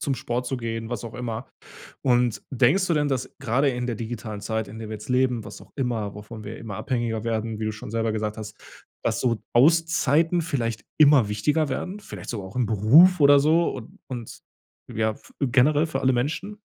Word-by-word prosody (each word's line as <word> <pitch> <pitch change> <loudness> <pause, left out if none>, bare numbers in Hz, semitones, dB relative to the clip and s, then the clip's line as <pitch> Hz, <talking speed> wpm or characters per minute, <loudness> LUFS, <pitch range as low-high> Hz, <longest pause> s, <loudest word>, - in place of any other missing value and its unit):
Zum 140 -5 0
Sport 120 +1 -3
zu 130 +1 -2
gehen, 115 -1 -4
was 120 -3 -4
auch 115 - -8
immer. 120 -1 -4 0.5
Und 125 -3 +2
denkst 135 +9 +3
du 170 - +1
denn, 150 -1 +1
dass 130 -3 -2
gerade 135 +2 +1
in 125 -2 -2
der 120 - -2
digitalen 110 -2 -6
Zeit, 110 0 -3
in 110 +2 -9
der 110 - -7
wir 110 - -5
jetzt 105 +3 -8
leben, 125 -3 +1
was - - -10
auch - - -16
immer 115 -6 -2
wovon 105 +1 -9
wir 110 +2 -7
immer 105 -4 -7
abhängiger 120 -3 -2
werden, 110 -1 -2
wie 110 - -1
du 110 - -1
schon 105 0 -9
selber 115 0 0
gesagt 110 0 -3
hast, 105 -1 -8 0.5
dass - - 0
so 120 -2 +1 0.2
Auszeiten 165 +3 +3
vielleicht 115 - -2
immer 145 -8 +6
wichtiger 145 +9 +1
werden? 190 +8 -4
Vielleicht 210 - -8
sogar 100 -5 -5
auch 100 - -13
im 125 - +2
Beruf 140 - +6
oder 145 0 +7
so? 160 +4 +3
Und 125 -4 -10
und 120 -4 -7 0.5
ja, 110 0 +1
f - - -18
generell 140 +4 +3
für 135 -4 -3
alle 130 0 +3
Menschen? 160 - -2
120 Hz, 210 wpm, -25 LUFS, 110-140 Hz, 0.5 s, oder